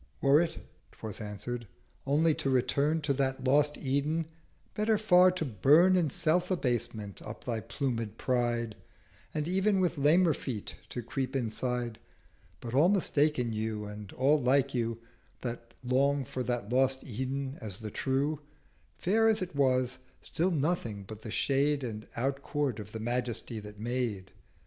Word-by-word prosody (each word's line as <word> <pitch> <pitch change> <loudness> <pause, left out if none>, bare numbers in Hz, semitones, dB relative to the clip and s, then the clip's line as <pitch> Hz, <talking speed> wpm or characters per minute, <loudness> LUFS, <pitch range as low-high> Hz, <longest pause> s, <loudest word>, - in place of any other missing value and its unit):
'Were 140 +3 +5
it,' 165 -1 -2 0.4
'twas 110 0 -7
answer'd, 110 +3 -5 0.4
'only 155 +3 +4
to 150 -2 -2
return 140 +5 +2
To 145 -2 +1
that 130 -1 -1
lost 145 +3 +3
Eden, 145 +4 0 0.5
better 215 +1 +2
far 185 -4 +6
to 180 -3 -2
burn 150 - +5
In 170 -4 +2
Self 175 +5 +1
abasement 120 - -2
up 110 - -8
thy 115 -3 -1
pluméd 115 -6 -3
Pride, 120 -3 0 0.6
And 155 0 -2
ev'n 190 +2 +2
with 175 -4 +1
lamer 160 +4 +5
feet 115 -8 -5 0.2
to 120 - -5
creep 130 +3 -3
inside—310 120 -1 -1 0.6
But 115 -1 -6
all 150 +7 +5
mistaken 150 - +2
you 110 -1 -2
and 105 -1 -8
all 145 +3 +3
like 135 +2 +3
you 115 -2 -1 0.4
That 115 -1 -6
long 135 +2 +2
for 130 - -4
that 120 -4 -2
lost 130 +1 +2
Eden 130 +3 -4
as 105 -5 -5
the 110 -1 -6
true; 140 +5 0 0.6
Fair 220 +5 +3
as 220 -3 +3
it 180 -4 -8
was, 130 -2 +2 0.2
still 175 +4 -1
nothing 145 - -1
but 110 +2 -10
the 110 - -7
shade 140 +5 +1
And 110 -3 -5
Out 135 +3 -1
court 140 -6 -1
of 105 - -8
the 110 - -5
Majesty 120 -1 -2
that 105 0 -10
made. 115 -5 -2
130 Hz, 155 wpm, -30 LUFS, 115-150 Hz, 0.6 s, far